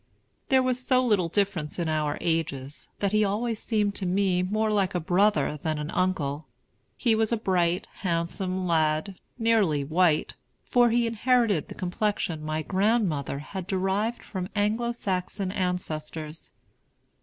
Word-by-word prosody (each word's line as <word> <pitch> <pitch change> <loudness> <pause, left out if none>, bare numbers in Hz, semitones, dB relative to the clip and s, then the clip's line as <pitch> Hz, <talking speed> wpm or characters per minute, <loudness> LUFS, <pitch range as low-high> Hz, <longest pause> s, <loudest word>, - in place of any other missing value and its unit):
There 265 -1 +5
was 255 0 0
so 255 -1 +3
little 205 -7 +2
difference 190 -5 -1
in 170 -2 -1
our 155 -2 0
ages, 155 -4 -2
that 200 -1 +1
he 215 0 +3
always 220 +3 -1
seemed 210 -3 0
to 190 - -1
me 185 -1 +2
more 215 +4 0
like 195 -3 +1
a - - +2
brother 175 -4 +2
than 155 -1 -1
an 150 +1 -4
uncle. 155 -5 -1 0.5
He 235 - +2
was 220 0 +1
a 235 - +2
bright, 180 -3 +1
handsome 185 +1 -2
lad, 160 +2 +1 0.2
nearly 215 - +2
white; 160 +1 +2 0.3
for 245 -1 +4
he 235 +1 +2
inherited 230 - +2
the - - -9
complexion 180 -3 -2
my 155 0 -2
grandmother 190 - +1 0.2
had 190 -2 -4
derived 195 +4 -1
from 185 -2 -5
Anglo 220 +3 +1
Saxon 190 -3 -3
ancestors. 160 -4 -4
185 Hz, 145 wpm, -27 LUFS, 160-215 Hz, 0.5 s, There